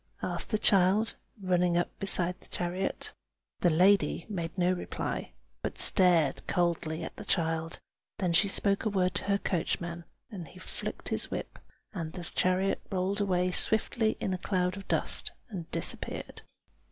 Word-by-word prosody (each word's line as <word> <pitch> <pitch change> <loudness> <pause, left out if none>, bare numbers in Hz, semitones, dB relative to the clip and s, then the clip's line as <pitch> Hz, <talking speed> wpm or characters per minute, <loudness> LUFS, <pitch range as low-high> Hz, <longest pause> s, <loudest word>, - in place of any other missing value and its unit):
asked - - -2
the 215 - +2
child, 200 +2 +3 0.3
running 180 -2 +2
up 175 - 0
beside 180 -2 +2
the - - -15
chariot. 180 +2 -2 0.5
The 175 - +4
lady 185 +5 +3
made 170 -3 -4
no 180 0 +3
reply, 180 - -4 0.3
but - - -4
stared 170 -7 +5
coldly 170 -2 0
at - - -7
the - - -7
child: 165 -3 0 0.4
then 180 -3 0
she 195 +4 +5
spoke 200 0 +2
a 220 - +1
word 185 -3 +1
to 180 - -3
her 200 0 +2
coachman, 170 -2 -2 0.3
and 180 -6 -7
he 185 - -15
flicked 185 - -6
his - - -1
whip, - - -5 0.3
and 165 -5 -5
the 180 - -6
chariot 185 +3 0
rolled 195 +2 0
away 180 -2 +1
swiftly 220 +3 +1
in 190 - -1
a 185 - -3
cloud 180 -1 0
of 195 - -9
dust, - - 0 0.2
and 180 -7 -6
disappeared. - - -1
180 Hz, 160 wpm, -30 LUFS, 175-195 Hz, 0.5 s, stared